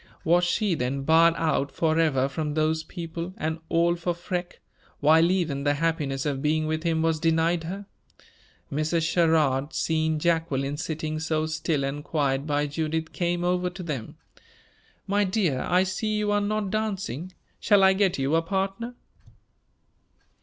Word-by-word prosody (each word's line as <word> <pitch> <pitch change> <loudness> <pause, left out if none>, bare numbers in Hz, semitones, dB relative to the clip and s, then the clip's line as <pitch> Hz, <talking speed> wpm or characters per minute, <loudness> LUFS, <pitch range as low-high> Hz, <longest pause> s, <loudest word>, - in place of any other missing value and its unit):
Was 175 +2 +3
she 200 +2 +1
then 135 -1 -2
barred 165 +3 +5
out 140 -3 0
forever 155 -4 +2
from 150 +1 -3
those 155 0 +1
people, 170 +2 -6
and 160 +1 -2
all 170 +1 +3
for 175 0 -2
Freke, 175 +1 -5 0.4
while 160 +3 +5
even 165 -7 0
the 145 0 +2
happiness 145 -3 -1
of 140 -2 -1
being 155 +1 +1
with 155 0 -1
him 165 -1 0
was 165 -1 +1
denied 165 +1 +1
her? 195 +4 -6 0.9
Mrs. 155 +2 0
Sherrard, 155 -4 +2
seeing 160 -1 0
Jacqueline 150 -4 0
sitting 155 0 -3
so 155 0 0
still 155 -2 -1
and 140 +2 -3
quiet 140 -2 -1
by 145 0 +1
Judith, 160 +2 -3
came 175 0 -1
over 180 0 +1
to 180 +1 -8
them. 140 -9 -5 0.9
"My 205 +1 +2
dear, 185 - 0
I 180 +1 +4
see 210 +3 -2
you 210 -1 0
are 205 0 +2
not 205 -1 -1
dancing; 195 - -3 0.3
shall 205 -2 +4
I 190 0 +6
get 190 -2 +1
you 135 +2 0
a 165 - +4
partner?" 195 +7 -3
160 Hz, 155 wpm, -26 LUFS, 150-180 Hz, 0.9 s, I